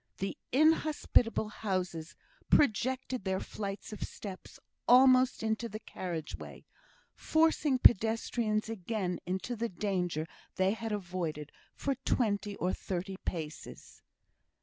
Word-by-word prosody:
The 195 - -3 0.2
inhospitable 300 -6 +3
houses 185 -6 -3 0.3
projected 260 -1 +2
their 190 0 0
flights 200 0 -6
of 210 - -8
steps 195 -3 -7 0.3
almost 255 -1 +6
into 220 +1 -1
the 215 +1 -6
carriage 170 -7 -5
way, - - -10 0.5
forcing 315 -3 +2
pedestrians 225 -1 +3
again 205 -3 -3
into 190 +6 -2
the 230 +1 -2
danger 180 -4 -1 0.3
they 190 +1 +3
had 225 +1 -4
avoided 175 -7 -3 0.2
for 275 - -1
twenty 210 -5 0
or 180 0 -1
thirty 190 +1 -4
paces. 160 -3 -6
210 Hz, 110 wpm, -32 LUFS, 185-235 Hz, 0.5 s, almost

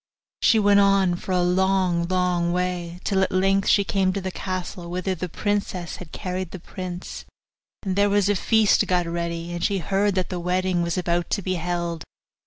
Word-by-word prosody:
She 225 - +5
went 205 -1 +5
on 195 -2 +4
for 180 - -6
a 180 -1 +2
long, 180 -1 +2
long 180 -1 +1
way, 180 -1 -2
till 195 -1 +1
at 190 - +1
length 195 +1 +2
she 200 - +5
came 195 -1 +1
to 200 - -2
the 190 -1 -4
castle 180 -2 -5
whither 185 +2 -2
the 180 0 -5
princess 195 -2 -2
had 175 -3 -10
carried 185 -1 -4
the 190 - -8
prince; 180 0 -7 0.6
and 190 -3 -2
there 200 +1 +3
was 200 -1 +2
a 205 - +3
feast 220 +1 +3
got 180 -1 +1
ready, 170 0 -3
and 175 - -4
she 200 - +1
heard 195 +3 0
that 185 -1 -1
the 180 - -3
wedding 180 0 0
was 170 +1 -1
about 175 -1 0
to 200 - -1
be 185 - -1
held. 170 -2 -3
185 Hz, 195 wpm, -24 LUFS, 175-195 Hz, 0.6 s, She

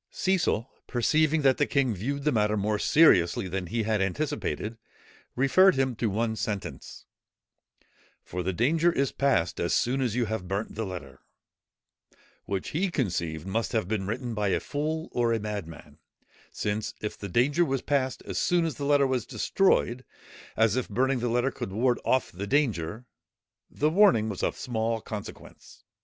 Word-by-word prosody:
Cecil, 175 - 0 0.2
perceiving 155 +5 +2
that 135 -2 +4
the 145 - +1
king 135 -4 +1
viewed 140 +9 -3
the 150 - +2
matter 105 -2 +1
more 105 +1 0
seriously 105 - +4
than 90 0 -3
he 115 +4 -1
had 110 -1 0
anticipated, 115 0 -2 0.6
referred 185 +9 +5
him 130 -2 0
to 115 - 0
one 110 +2 -1
sentence, 105 -3 -5 1.2
"for 90 - -5
the 95 +2 -1
danger 155 - +2
is 140 -4 0
past 90 -12 +1
as 85 - 0
soon 130 +3 +1
as 120 -4 0
you 125 -1 +1
have 110 -4 -4
burnt 100 +4 -3
the 110 -1 -3
letter," 70 -8 -8 1.3
which 95 -2 -3
he 185 +5 0
conceived 85 - -2
must 110 +5 -2
have 110 -6 0
been 100 -2 -2
written 120 +2 -3
by 105 -1 -1
a 95 - +1
fool 155 +3 -3
or 120 -1 +1
a 115 - 0
madman, 80 -8 -7 0.5
since 105 +1 -3
if 105 - -4
the 100 - -7
danger 140 - +3
was 135 -5 -1
past 135 -2 -1
as - - -3
soon 175 -1 +2
as 160 - -3
the 140 - -3
letter 145 -1 +4
was 130 -3 -1
destroyed, 130 -10 +1 0.5
as 110 -1 +3
if 130 - -2
burning 130 +5 +1
the 120 0 -1
letter 125 +3 +1
could 95 - -6
ward 120 +4 +1
off 130 -1 +1
the 100 +3 -6
danger, 115 - 0 0.6
the 150 +2 0
warning 175 - +4
was 100 - -5
of - - -1
small 115 -1 -1
consequence. 105 -1 -10
115 Hz, 170 wpm, -27 LUFS, 105-140 Hz, 1.3 s, referred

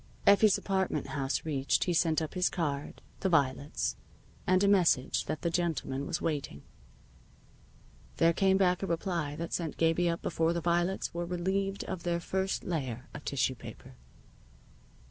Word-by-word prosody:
Effie's 200 0 +6
apartment 190 -2 -1
house 140 0 -2
reached, 140 -3 +1
he 180 - 0
sent 160 -1 +2
up 155 - -5
his 180 0 +2
card, 145 -5 -3 0.2
the 190 - 0
violets, 145 -3 +1 0.5
and 185 +1 +4
a - - +4
message 180 -10 +3
that 155 +1 -4
the 170 - +1
gentleman 155 -5 -1
was 175 - -1
waiting. 140 - -3 1.5
There 165 0 +4
came 190 +2 +3
back 180 -2 +2
a 195 - -2
reply 170 -4 -2
that 170 +2 -5
sent 165 -3 -2
Gabie 165 +1 +2
up 170 - -3
before 165 +1 +1
the 170 - -1
violets 175 +3 0
were 170 0 -3
relieved 195 +3 -1
of 190 -2 -5
their 170 0 -1
first 190 +2 -2
layer 130 -7 -4
of 150 - -8
tissue 135 -1 +1
paper. 120 - -11
170 Hz, 160 wpm, -30 LUFS, 150-185 Hz, 1.5 s, Effie's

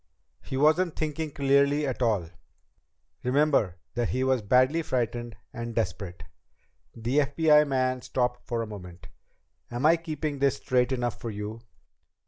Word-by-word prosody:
"He 130 - -5
wasn't 155 +4 +3
thinking 155 0 -2
clearly 140 +1 +2
at 130 -2 -3
all. 100 -9 +1 0.9
Remember 130 - +2 0.2
that 120 0 -1
he 130 +1 0
was 130 -2 +2
badly 130 +9 +3
frightened 120 -5 -2 0.2
and 115 -1 -5
desperate." 95 -5 -3 0.7
The 120 +5 0
FBI 150 +1 +4
man 130 -2 0
stopped 125 -1 -2
for 115 -1 -1
a - - -4
moment. 90 -4 -10 0.6
"Am 120 +4 -2
I 165 +2 +6
keeping 155 -3 -4
this 140 0 +3
straight 125 -2 +1
enough 120 -2 -2
for 115 - -4
you?" 105 +2 -6
130 Hz, 140 wpm, -27 LUFS, 115-145 Hz, 0.9 s, I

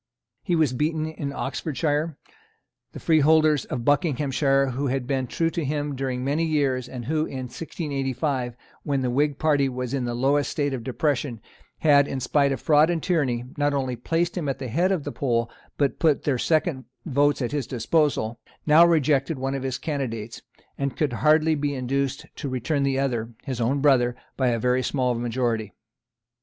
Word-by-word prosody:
He 180 -4 0
was 155 -6 +2
beaten 155 +4 0
in 155 -3 -4
Oxfordshire. 150 +2 -2 0.8
The - - -7
freeholders 155 -2 +4
of 120 -2 -4
Buckinghamshire, 140 -2 +2
who 135 +3 -2
had 130 -1 -1
been 130 0 -1
true 165 +6 0
to 170 - -2
him 145 0 -2
during 130 -1 -2
many 145 +5 0
years, 140 -6 0
and 125 -3 -7
who 155 +3 0
in 130 -1 -5
1685, 135 -5 -3 0.3
when 140 -2 -1
the 125 - 0
Whig 145 +2 +1
party 145 -3 +2
was 125 0 -4
in 135 -3 -1
the 120 0 -2
lowest 140 +3 +2
state 145 -2 -1
of 125 -3 -4
depression, 135 -2 -1 0.4
had, 145 -2 +5
in 135 - -3
spite 140 +2 +2
of 135 - -2
fraud 150 +4 +4
and 170 -3 -1
tyranny, 130 -9 0
not 145 0 +1
only 130 -2 -1
placed 165 +8 -1
him 160 -6 -2
at 135 - -2
the 130 -2 -5
head 175 - +1
of 180 -6 0
the - - -4
poll 115 -3 -1 0.3
but 140 -4 0
put 155 -4 +2
their 135 -4 0
second 155 -3 +1 0.2
votes 145 -1 +2
at 125 -3 -2
his 145 -4 -2
disposal, 125 -3 0 0.3
now 155 +2 +7
rejected 155 -3 +2
one 135 +1 -2
of 135 - -3
his 130 -1 -2
candidates, 120 -7 -4 0.4
and 140 -1 -2
could 150 -5 0
hardly 155 +5 +3
be 145 -1 -1
induced 135 +1 -2
to 140 - -5
return 130 +4 -1
the 135 -1 +1
other, 120 -4 -1
his 130 -3 -4
own 135 +5 +1
brother, 125 -4 +3 0.2
by 130 - +1
a 120 -1 +2
very 125 +2 +1
small 130 -1 0
majority. 115 -3 -2
140 Hz, 185 wpm, -25 LUFS, 125-150 Hz, 0.8 s, now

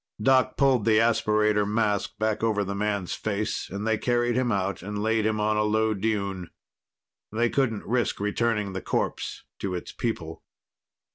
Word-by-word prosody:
Doc 130 +4 +3
pulled 135 -5 +3
the 110 -1 +4
aspirator 105 -2 +3
mask 105 0 0
back 110 +1 0
over 110 -2 +1
the 100 0 -3
man's 100 -2 -1
face 105 0 -2
and 100 +2 -4
they 110 -1 +1
carried 120 0 +1
him 125 -1 +1
out 100 -2 -1
and 105 +2 -4
laid 110 -1 +2
him 110 -1 0
on 105 0 +1
a - - +3
low 110 +1 +2
dune. 100 -4 -2 0.8
They 115 +2 +1
couldn't 120 -7 0
risk 120 +2 0
returning 105 -1 0
the 95 - -4
corpse - - -2 0.2
to 95 -2 -2
its 90 - -6
people. 80 -9 -4
105 Hz, 165 wpm, -26 LUFS, 100-115 Hz, 0.8 s, the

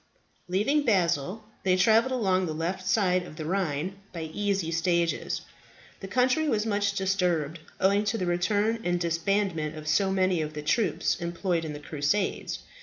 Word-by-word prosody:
Leaving 210 +12 +2
Basle, 185 - +1 0.2
they 185 -1 +3
travelled 220 +7 +4
along 190 -7 +1
the 155 - -3
left 185 +4 -3
side 185 -2 +3
of 175 -3 -10
the 155 - -6
Rhine 180 0 -1
by 165 -2 -5
easy 200 -5 -1
stages. 170 0 0 0.6
The 195 - -7
country 255 +8 +2
was 215 -3 +1
much 205 -2 +1
disturbed, 180 -5 0 0.2
owing 200 +2 +3
to 210 +2 0
the 185 - -1
return 205 +6 +1
and 175 0 0
disbandment 170 -1 0
of 155 0 -8
so 175 +6 +3
many 185 -3 +2
of 155 0 -4
the 150 - -5
troops 185 +2 +1
employed 170 0 -1
in 155 -2 -4
the 145 - -7
Crusades. 150 +6 -1
185 Hz, 165 wpm, -27 LUFS, 165-205 Hz, 0.6 s, travelled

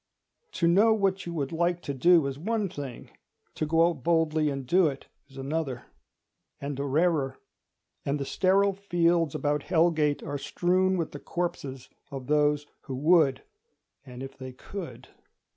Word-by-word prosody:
To 170 - +1
know 210 +6 +5
what 195 -3 0
you 170 - -4
would 140 -4 -2
like 170 +1 0
to 140 - -3
do 165 +4 +5
is 135 0 -4
one 210 +2 -1
thing; 140 -8 -8 0.4
to 155 - -2
go 165 +2 +4
out 165 -6 -3
boldly 160 -2 +2
and 135 -2 -4
do 175 +6 +4
it 135 -2 -5 0.2
is 135 - -15
another—and 140 0 -7
a - - -1
rarer; 145 -2 +1 0.7
and 145 +1 -1
the 140 - -3
sterile 195 +5 +2
fields 175 -5 +1
about 145 0 0
Hell 170 +3 +3
Gate 150 -3 0
are 145 0 -4
strewn 185 +6 +1
with 165 -3 -2
the 145 - -8
corpses 135 -8 -4 0.2
of 135 -2 -7
those 150 0 +2 0.2
who 135 - -5
would 150 -1 +3 0.6
an 125 -1 -9
if 135 - -8
they 130 -1 -8
could. 130 -4 -8
155 Hz, 160 wpm, -27 LUFS, 140-175 Hz, 0.7 s, know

